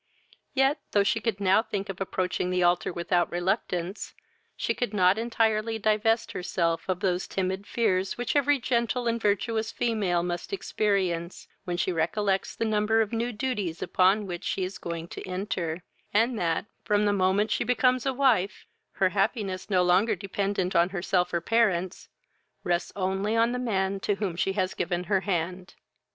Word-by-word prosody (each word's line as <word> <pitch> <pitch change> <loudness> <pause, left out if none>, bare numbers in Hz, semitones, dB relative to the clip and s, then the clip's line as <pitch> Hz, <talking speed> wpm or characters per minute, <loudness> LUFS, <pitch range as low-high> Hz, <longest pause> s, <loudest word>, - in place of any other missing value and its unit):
yet, 270 +3 +3
though 205 - +5
she 210 +3 +1
could 225 -3 -2
now 195 +1 +4
think 200 -3 -4
of 195 -1 -7
approaching 185 -1 -1
the 180 0 +1
altar 175 +1 +2
without 175 0 0
reluctance, 180 0 -2 0.4
she - - 0
could 230 -4 -3
not 185 -1 +5
entirely 225 -1 0
divest 220 +1 +1
herself 170 -1 -1
of 180 -1 -1
those 180 -1 0
timid 190 +1 -2
fears 195 -5 0
which 245 +3 -2
every 285 0 +3
gentle 240 0 0
and 230 0 0
virtuous 220 +2 0
female 205 -9 0
must 175 -1 -4
experience 190 - -1 0.2
when 175 -1 -2
she 180 - 0
recollects 190 +4 0
the 230 - -1
number 215 +1 +2
of 220 0 -2
new 235 +2 -1
duties 210 -8 -3
upon 195 +3 +3
which 175 -2 -6
she 190 - -1
is 185 +2 -5
going 170 -1 -5
to - - -8
enter, 180 -3 -3 0.3
and 225 +2 +2
that, 165 +1 0 0.2
from 210 0 +2
the 205 - +3
moment 195 +2 +2
she - - +1
becomes 250 +1 +2
a 270 - +1
wife, 245 -8 +1 0.3
her 190 - +2
happiness, 195 -1 -1
no 185 -3 +3
longer 190 +5 +3
dependent 195 0 -2
on 170 +1 +4
herself 180 -1 0
or 170 - 0
parents, 190 -4 +1 0.5
rests 175 0 0
only 195 +3 -1
on 230 +1 +3
the 250 - -2
man 195 -5 0
to 205 +1 0
whom 195 -4 -3
she 195 +3 0
has 190 -2 -1
given 175 0 -2
her 195 +1 +1
hand. 180 0 -3
195 Hz, 170 wpm, -27 LUFS, 180-225 Hz, 0.5 s, though